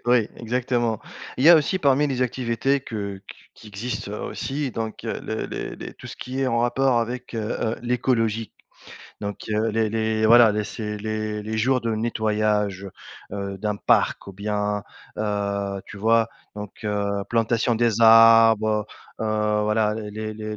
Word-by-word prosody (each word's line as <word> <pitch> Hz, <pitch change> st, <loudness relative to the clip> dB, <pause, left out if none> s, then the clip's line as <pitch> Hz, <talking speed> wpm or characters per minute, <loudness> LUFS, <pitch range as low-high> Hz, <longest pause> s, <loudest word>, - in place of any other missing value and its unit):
oui, 120 Hz, -3 st, +3 dB
exactement. 120 Hz, -1 st, -1 dB, 0.4 s
Il 130 Hz, -, 0 dB
y 165 Hz, -, +9 dB
a 170 Hz, -, +10 dB
aussi 170 Hz, +5 st, +1 dB
parmi 145 Hz, -1 st, +3 dB
les 130 Hz, -2 st, -1 dB
activités 125 Hz, +2 st, 0 dB
que 100 Hz, -5 st, -5 dB
qu -, -, -10 dB, 0.2 s
qui 110 Hz, -, -14 dB
existent 105 Hz, 0 st, -5 dB
aussi 140 Hz, -1 st, -3 dB
donc 110 Hz, -2 st, -5 dB
heu, -, -, -3 dB
le -, -, -3 dB
les -, -, -6 dB
les -, -, -8 dB
tout -, -, -12 dB
ce -, -, -9 dB
qui 130 Hz, +2 st, -5 dB
est 135 Hz, -, +1 dB
en 115 Hz, -1 st, +1 dB
rapport 125 Hz, +1 st, +2 dB
avec, 120 Hz, +1 st, -4 dB
heu, -, -, -2 dB, 0.2 s
heu, 115 Hz, 0 st, -1 dB
l'écologie 115 Hz, -3 st, 0 dB, 0.7 s
donc 100 Hz, -1 st, -4 dB
heu, 110 Hz, +1 st, +1 dB
les 110 Hz, 0 st, +1 dB
les 110 Hz, 0 st, 0 dB
voilà 120 Hz, 0 st, +7 dB
les 105 Hz, 0 st, -1 dB
c'est 105 Hz, -1 st, -5 dB
les 110 Hz, 0 st, -3 dB
les 110 Hz, 0 st, -3 dB
jours 125 Hz, +3 st, +2 dB
de 115 Hz, -1 st, -1 dB
nettoyage, 105 Hz, -3 st, 0 dB, 0.4 s
heu, 100 Hz, -1 st, -4 dB
d'un 105 Hz, 0 st, -2 dB
parc, -, -, +1 dB
ou 100 Hz, -, -8 dB
bien, 105 Hz, +1 st, -2 dB, 0.3 s
heu, 100 Hz, -2 st, -2 dB
tu -, -, -10 dB
vois? 115 Hz, +2 st, +3 dB, 0.3 s
Donc 105 Hz, -1 st, -7 dB
heu, 100 Hz, -1 st, -1 dB
plantation 115 Hz, 0 st, +1 dB
des 115 Hz, -1 st, +1 dB
arbres. 115 Hz, -1 st, +6 dB, 0.3 s
Heu, -, -, -1 dB, 0.4 s
voilà 105 Hz, 0 st, +1 dB
les 105 Hz, -1 st, -6 dB, 0.2 s
les 110 Hz, 0 st, -6 dB
110 Hz, 170 wpm, -23 LUFS, 105-120 Hz, 0.7 s, a